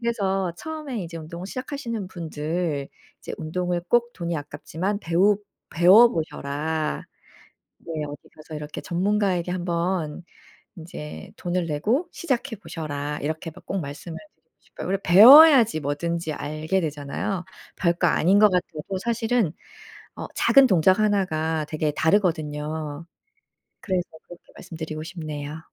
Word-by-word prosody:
그래서 195 -6 -1
처음에 305 - -5
이제 165 0 -8
운동을 170 +3 -8
시작하시는 235 -4 -5
분들 160 -3 -3 0.3
이제 - - -7
'운동을 175 +2 -2
꼭 240 0 +2
돈이 170 -2 -3
아깝지만 160 +7 -4
배우 190 +4 +3 0.3
배워보셔라.' 160 -6 +3 0.8
네 - - -9 0.2
'어디 145 0 -10
가서 155 +1 -10
이렇게 150 0 -6
전문가에게 185 -1 0
한번 175 -2 -2 0.5
인제 160 -3 -9
돈을 175 -1 -2
내고 210 - 0
시작해 255 -7 -2
보셔라.' 150 -6 -5
이렇게 160 +2 -3
마 175 +4 -15
꼭 195 - -2
말씀을 145 +3 -7 0.2
드리고 - - -47
싶어요. - - -9
우리가 195 +1 -1
배워야지 240 - +9
뭐든지 160 +3 -2
알게 155 +6 -2
되잖아요. 160 +6 -3 0.3
별거 170 0 +2
아닌 185 +6 +3
거 210 0 +7
같아도 180 0 -2
사실은 230 -4 0 0.6
어 - - -5
작은 275 -1 +6
동작 185 -1 +4
하나가 160 -7 +1
되게 155 -1 -1
다르거든요. 155 -3 -1 0.8
그래서 185 -3 -2 0.2
그렇게 175 - -14
말씀드리고 160 -1 -7
싶네요. 155 -3 -6
170 Hz, 315 characters per minute, -24 LUFS, 155-200 Hz, 0.8 s, 배워야지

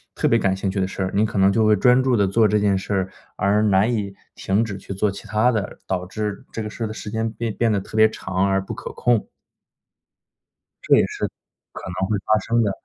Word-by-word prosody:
特 - - +1
别 - - +3
感 95 -1 +1
兴 95 0 -2
趣 100 - -2
的 95 - 0
事 95 - -4
儿， 95 - -2
您 100 - +3
可 105 -2 -4
能 95 +1 +5
就 110 - +2
会 110 - +5
专 125 +5 +4
注 130 -2 +2
地 100 -2 +3
做 110 +3 +3
这 105 +1 +2
件 100 -1 +2
事 95 +2 -3
儿， 95 -1 0 0.3
而 105 +1 +2
难 105 +2 +3
以 100 -3 -3 0.2
停 105 +4 0
止 105 - -5
去 95 - -11
做 100 +2 +1
其 100 +2 -10
他 110 +4 +2
的， 105 -4 -3
导 90 -1 -2
致 105 +1 -4
这 110 - -4
个 105 - -5
事 115 - -6
儿 - - -2
的 110 - -6
时 105 - -7
间 110 0 -1
变 115 -2 -4
变 115 -2 +1
得 100 - +1
特 95 - -10
别 110 0 +6
长 95 -2 -1
而 95 0 +2
不 - - -5
可 - - -7
控。 120 -3 +1 1.6
这 - - +5
也 - - +4
是 - - -3 0.5
可 - - -9 0.2
能 95 +2 -1
会 105 - +1
发 110 - +4
生 115 0 +1
的。 100 - +1
105 Hz, 275 characters per minute, -22 LUFS, 95-110 Hz, 1.6 s, 别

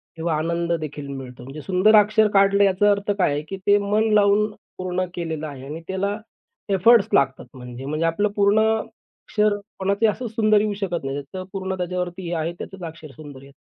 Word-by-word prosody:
किंवा 165 -1 -1
आनंददेखील 160 -3 -2
मिळतो. 130 -3 -8
म्हणजे 135 +4 -9
सुंदर 195 +6 +3
अक्षर 215 +1 +5
काढलं 200 0 +4
याचा 200 +1 +3
अर्थ 200 0 0
काय 180 -6 +2
आहे, 145 - -2
की 190 +5 -7
ते 205 0 +6
मन 210 +2 +1
लावून 210 +1 +4 0.3
पूर्ण 185 0 -2
केलेलं 160 -3 -4
आहे 135 -2 -9
आणि 155 +4 -7
त्याला 200 +2 -2 0.5
एफोर्ट्स 200 +3 +5
लागतात 135 -2 +2
म्हणजे-म्हणजे 130 +6 -4
आपलं 205 +6 +1
पूर्ण 205 +1 +3 0.2
अक्षर 215 -1 -2 0.2
कोणाचंही 200 +3 +2
असंच 240 -2 -6
सुंदर 215 -2 +4
येऊ 210 -1 -1
शकत 175 -6 -2
नाही. 135 +1 -3
त्याचं 185 +7 -8
पूर्ण 190 -1 -3
त्याच्यावरती 180 0 -4
हे 175 - -3
आहे 165 +1 -2
त्याचंच 195 -2 -8
अक्षर 155 -2 -11
सुंदर 145 -3 -11
येतं. 140 0 -17
185 Hz, 180 wpm, -22 LUFS, 155-205 Hz, 0.5 s, ते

